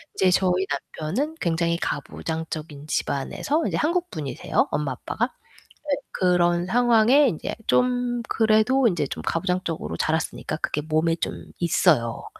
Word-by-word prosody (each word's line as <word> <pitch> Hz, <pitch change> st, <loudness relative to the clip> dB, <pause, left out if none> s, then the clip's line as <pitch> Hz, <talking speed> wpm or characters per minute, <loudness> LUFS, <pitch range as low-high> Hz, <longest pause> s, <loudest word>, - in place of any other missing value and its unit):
이제 185 Hz, -, +3 dB
저희 185 Hz, 0 st, +2 dB, 0.3 s
남편은 255 Hz, -, -2 dB
굉장히 170 Hz, 0 st, +1 dB
가부장적인 155 Hz, -1 st, -5 dB
집안에서 280 Hz, -, -1 dB
이제 -, -, -2 dB
한국분이세요. 315 Hz, -, -1 dB
엄마, 145 Hz, -3 st, -1 dB
아빠가. 230 Hz, -, -2 dB, 0.6 s
네, 280 Hz, -, +2 dB, 0.2 s
그런 175 Hz, -1 st, +2 dB
상황에 240 Hz, +5 st, +5 dB
인제 160 Hz, -, -3 dB
좀 245 Hz, -1 st, +1 dB
그래도 225 Hz, +3 st, +3 dB
인제 165 Hz, -7 st, 0 dB
좀 -, -, -6 dB
가부장적으로 165 Hz, -, -2 dB
자랐으니까 160 Hz, 0 st, -1 dB
그게 150 Hz, -, -2 dB
몸에 160 Hz, +2 st, +1 dB
좀 -, -, -4 dB
있어요. 155 Hz, -8 st, +2 dB
175 Hz, 320 characters per minute, -24 LUFS, 155-240 Hz, 0.6 s, 상황에